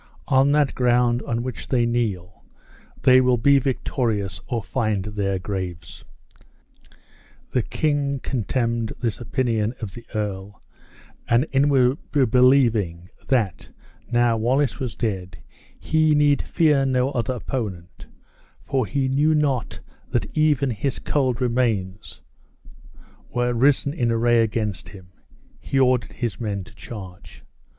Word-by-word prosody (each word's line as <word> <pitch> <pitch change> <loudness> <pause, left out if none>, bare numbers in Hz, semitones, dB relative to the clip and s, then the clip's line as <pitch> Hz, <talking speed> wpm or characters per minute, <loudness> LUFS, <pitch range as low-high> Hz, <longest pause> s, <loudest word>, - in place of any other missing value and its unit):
On 135 +1 +4
that 145 -2 +2
ground 120 -1 +2
on 115 0 -1
which 125 -1 -6
they 120 -3 +2
kneel, 105 -7 -2 0.6
they 130 0 +6
will 125 -1 +3
be 140 +4 +4
victorious 110 -8 -2
or 115 -4 -2
find 110 -6 -1
their 100 -2 -2
graves." 95 -3 -6 1.5
The 125 - +1
king 145 +1 -1
contemned 115 -2 -1
this 115 -3 -2
opinion 115 -2 -1
of 105 -5 -6
the 120 - -10
earl, 100 -2 -4 0.7
and 120 +4 +3
inwardly 135 0 +2
believing 115 -8 +3 0.2
that, 115 - 0 0.4
now 120 -1 +3
Wallace 125 +1 +1
was 125 -4 -4
dead, 95 -6 -3 0.4
he 155 -1 +2
need 145 -1 +3
fear 150 -5 +2
no 130 0 +1
other 125 -1 -2
opponent 100 -8 -6 0.5
(for 130 -5 -1
he 135 +6 -1
knew 145 +4 +2
not 140 -5 -1 0.3
that - - -2
even 145 -4 +2
his 120 +5 -2
cold 130 -4 0
remains 115 -6 -1 1.1
were 120 0 0
risen 140 +3 +2
in 120 -7 0
array 115 0 +3
against 105 -3 -2
him), 95 -3 -14 0.5
he 135 - -3
ordered 130 -2 +2
his 120 -5 -4
men 100 -4 -3
to 105 - -16
charge. 100 -5 -11
120 Hz, 125 wpm, -23 LUFS, 105-135 Hz, 1.5 s, they